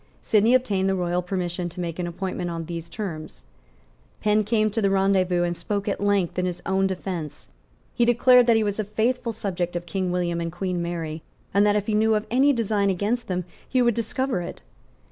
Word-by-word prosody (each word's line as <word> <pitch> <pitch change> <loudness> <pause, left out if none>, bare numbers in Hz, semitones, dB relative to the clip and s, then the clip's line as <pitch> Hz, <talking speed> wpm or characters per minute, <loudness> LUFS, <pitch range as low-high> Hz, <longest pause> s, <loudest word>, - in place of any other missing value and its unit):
Sidney 220 +3 +4
obtained 200 -7 +1
the 190 - +1
royal 180 -1 0
permission 180 -1 -3
to 175 +2 -11
make 170 -1 -4
an 175 - -1
appointment 180 0 -4
on 165 -1 -4
these 170 0 -6
terms. 165 -6 -6 0.8
Penn 215 0 +2
came 215 0 +1
to 225 - -1
the 200 - +3
rendezvous, 190 -2 +2
and 175 0 -1
spoke 200 +3 -3
at 200 - -1
length 200 -4 +1
in 180 - +1
his 180 - -4
own 195 0 +2
defence. 180 -5 -5 0.4
He 240 - +2
declared 245 +1 +5
that 230 - +5
he 220 - +3
was 205 0 -2
a - - +1
faithful 230 +4 -1
subject 180 -5 -3
of 175 0 -3
King 180 +1 -2
William 175 -1 -1
and 165 0 -3
Queen 180 0 -2
Mary, 165 -2 -4 0.3
and 200 +2 +4
that, 205 - +3
if 205 -1 0
he 215 - -1
knew 220 +1 +3
of 210 0 -1
any 270 +4 +5
design 215 -5 +1
against 205 +6 -1
them, 180 -2 -2 0.2
he 260 - +1
would 240 -1 +3
discover 235 -1 -1
it. 175 - -8
195 Hz, 210 wpm, -24 LUFS, 175-215 Hz, 0.8 s, declared